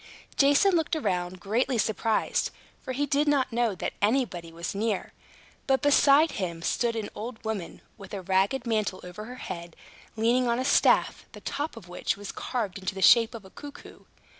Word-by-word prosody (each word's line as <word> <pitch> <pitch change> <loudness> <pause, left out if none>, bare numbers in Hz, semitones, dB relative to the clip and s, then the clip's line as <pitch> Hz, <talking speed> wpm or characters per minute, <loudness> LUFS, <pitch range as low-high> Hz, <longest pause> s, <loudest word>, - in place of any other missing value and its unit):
Jason 285 +8 +5
looked 325 -1 +1
round 180 - -2
greatly 235 +7 0
surprised, 220 0 0 0.3
for - - -6
he 280 +3 0
did 285 +2 +1
not 275 -4 +2
know 235 -4 +1
that - - -4
anybody 205 -7 0
was 170 +1 -5
near. 210 0 -2 0.5
But 265 -1 +2
beside 290 +2 +5
him 170 -4 -4
stood 235 +4 0
an 220 -2 -4
old 225 +1 -7
woman, 210 -6 -4 0.2
with 195 -1 -11
a 190 - -6
ragged 195 +8 +1
mantle 215 -5 -1
over 180 +4 -8
her 250 +2 -8
head, 170 -8 -7 0.4
leaning 240 +3 +2
on 235 0 +1
a 255 - -1
staff, 285 - +3
the - - -11
top 290 -3 -4
of 200 -6 -11
which 180 +2 -2
was 205 0 -7
carved 215 -7 -3
into 185 0 -4
the 190 - -5
shape 230 0 +6
of 220 -4 -9
a 190 - -14
cuckoo. 290 -1 -12
225 Hz, 185 wpm, -27 LUFS, 190-260 Hz, 0.5 s, shape